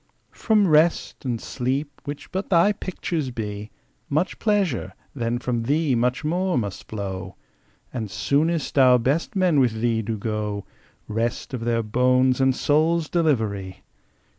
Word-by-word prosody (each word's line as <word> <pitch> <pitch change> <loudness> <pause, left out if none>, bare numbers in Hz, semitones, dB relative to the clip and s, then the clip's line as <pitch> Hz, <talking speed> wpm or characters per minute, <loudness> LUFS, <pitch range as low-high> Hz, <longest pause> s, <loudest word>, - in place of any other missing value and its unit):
From 215 -3 +2
Rest 155 -2 +2
and 120 -3 -1
Sleep, 135 +5 -3
which 145 -1 -7
but 190 +2 -3
thy 180 +2 +5
picture 170 -8 -3
be, 105 -2 -5 0.4
Much 155 +6 0
pleasure, 190 - 0 0.2
then 120 -2 -1
from 120 -1 -2
thee 145 +4 +1
much 125 +1 +1
more 180 +3 0
must 100 -5 -4
flow; 95 -3 -5 0.6
And 115 -5 -4
soonest 140 - 0
our 130 -1 +7
best 140 - -1
men 180 -6 +3
with 120 -4 +2
thee 115 -1 +1
do 110 0 -3
go 105 -1 -3 0.4
Rest 115 +4 -2
of 120 -2 -4
their 115 -1 +1
bones 125 +3 +2
and 130 -1 +3
souls' 155 +3 +2
delivery! 110 - 0
125 Hz, 140 wpm, -24 LUFS, 110-155 Hz, 0.6 s, our